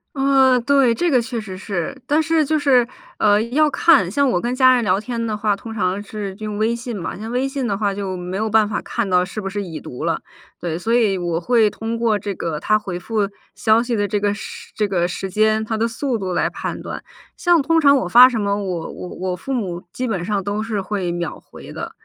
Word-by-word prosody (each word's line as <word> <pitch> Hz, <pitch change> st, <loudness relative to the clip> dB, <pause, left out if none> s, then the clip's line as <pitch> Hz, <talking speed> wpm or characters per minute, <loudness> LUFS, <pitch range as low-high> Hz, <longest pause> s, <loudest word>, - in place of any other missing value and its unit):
呃， 270 Hz, -1 st, +4 dB
对， 270 Hz, -3 st, +3 dB
这 345 Hz, +5 st, +1 dB
个 250 Hz, -3 st, +4 dB
确 235 Hz, -1 st, -4 dB
实 190 Hz, -3 st, -8 dB
是。 190 Hz, +3 st, -4 dB
但 300 Hz, +3 st, +3 dB
是 320 Hz, -1 st, +2 dB
就 310 Hz, +2 st, +1 dB
是， 260 Hz, -5 st, +3 dB, 0.3 s
呃， 210 Hz, 0 st, +4 dB
要 295 Hz, +6 st, +2 dB
看 280 Hz, -, +4 dB
像 280 Hz, +6 st, +2 dB
我 175 Hz, -, +1 dB
跟 245 Hz, +4 st, -2 dB
家 255 Hz, -1 st, +6 dB
人 245 Hz, -, +1 dB
聊 190 Hz, -3 st, +2 dB
天 230 Hz, +2 st, -3 dB
的 215 Hz, -, -1 dB
话， 210 Hz, -2 st, 0 dB
通 225 Hz, +2 st, -8 dB
常 200 Hz, -2 st, -1 dB
是 205 Hz, -1 st, -6 dB
用 215 Hz, -1 st, -4 dB
微 220 Hz, +2 st, +1 dB
信 235 Hz, -1 st, -5 dB
嘛， 175 Hz, -1 st, -5 dB
像 220 Hz, +2 st, -6 dB
微 255 Hz, +2 st, +1 dB
信 270 Hz, -2 st, -2 dB
的 200 Hz, -1 st, -1 dB
话 200 Hz, -2 st, 0 dB
就 195 Hz, -2 st, -4 dB
没 180 Hz, +2 st, -5 dB
有 220 Hz, +1 st, -1 dB
办 215 Hz, -1 st, +4 dB
法 210 Hz, -, -2 dB
看 235 Hz, -3 st, -2 dB
到 180 Hz, 0 st, +3 dB
是 205 Hz, +3 st, -6 dB
不 195 Hz, -, -4 dB
是 205 Hz, +1 st, -3 dB
已 170 Hz, -5 st, -6 dB
读 125 Hz, -, -6 dB
了， -, -, 0 dB, 0.4 s
对。 170 Hz, -1 st, -3 dB
所 225 Hz, +5 st, -1 dB
以 215 Hz, -5 st, +3 dB
我 175 Hz, -2 st, -2 dB
会 225 Hz, +2 st, +3 dB
通 225 Hz, +2 st, -4 dB
过 230 Hz, -2 st, +2 dB
这 200 Hz, -1 st, -4 dB
个 165 Hz, -3 st, -3 dB
他 215 Hz, 0 st, +2 dB
回 190 Hz, -4 st, -5 dB
复 205 Hz, +2 st, -1 dB, 0.3 s
消 220 Hz, +1 st, +3 dB
息 240 Hz, -1 st, -3 dB
的 205 Hz, -2 st, +1 dB
这 205 Hz, +1 st, -1 dB
个 205 Hz, 0 st, +1 dB
时 -, -, -9 dB
这 210 Hz, -1 st, 0 dB
个 175 Hz, -3 st, +1 dB
时 190 Hz, +2 st, -4 dB
间、 215 Hz, +2 st, +2 dB
他 220 Hz, -, -2 dB
的 220 Hz, +1 st, +1 dB
速 235 Hz, +2 st, -2 dB
度 190 Hz, -3 st, -4 dB
来 -, -, +1 dB
判 -, -, -5 dB
断。 -, -, -6 dB, 0.3 s
像 350 Hz, -3 st, +3 dB
通 325 Hz, +3 st, +2 dB
常 280 Hz, -1 st, +6 dB
我 190 Hz, -, -1 dB
发 245 Hz, +6 st, +8 dB
什 235 Hz, -4 st, -2 dB
么， 200 Hz, -1 st, 0 dB
我 185 Hz, -5 st, -3 dB
我 180 Hz, -, -8 dB
我 185 Hz, 0 st, -3 dB
父 270 Hz, +9 st, -7 dB
母 185 Hz, -8 st, -3 dB
基 255 Hz, +5 st, -3 dB
本 190 Hz, -6 st, -2 dB
上 200 Hz, +2 st, -1 dB
都 205 Hz, +2 st, -2 dB
是 215 Hz, -3 st, -2 dB
会 190 Hz, -3 st, -2 dB
秒 170 Hz, -2 st, -4 dB
回 -, -, -12 dB
的， -, -, -6 dB
215 Hz, 265 characters per minute, -20 LUFS, 195-245 Hz, 0.4 s, 发